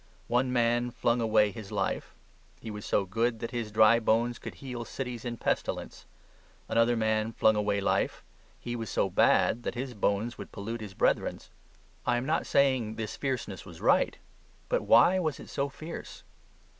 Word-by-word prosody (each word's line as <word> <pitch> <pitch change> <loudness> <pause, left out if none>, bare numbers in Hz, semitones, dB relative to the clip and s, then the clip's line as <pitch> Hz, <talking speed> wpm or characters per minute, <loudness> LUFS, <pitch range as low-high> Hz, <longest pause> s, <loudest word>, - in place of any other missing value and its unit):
One 125 +1 +1
man 120 0 +2
flung 120 0 0
away 110 -2 +3
his 110 -3 -9
life; - - -2 0.4
he 110 - -7
was 105 0 -7
so 100 - +2
good 115 +5 0
that 115 +1 -5
his 115 -3 -3
dry 110 +2 +6
bones 120 +2 +1
could - - -8
heal 125 -3 -6
cities 125 -1 -6
in 120 -1 -3
pestilence. - - -3 0.6
Another 115 +1 +3
man 110 0 +1
flung 110 -1 +4
away 105 -1 +1
life; 100 - 0 0.4
he 120 0 -5
was 115 -3 -4
so - - 0
bad 120 - +3
that 120 - -4
his 125 +1 -4
bones 105 +2 -1
would - - -8
pollute 115 +3 -5
his 100 -3 -8
brethren's. - - 0 0.5
I 120 -1 +1
am 120 - -2
not 155 +3 0
saying 130 -6 +2
this 110 -2 -4
fierceness 125 -8 -3
was 85 -4 -12
right; - - +3 0.5
but - - +1
why 185 +1 +5
was 155 -5 -1
it - - -11
so 140 0 -1
fierce? 155 +4 -9
115 Hz, 175 wpm, -29 LUFS, 110-125 Hz, 0.6 s, dry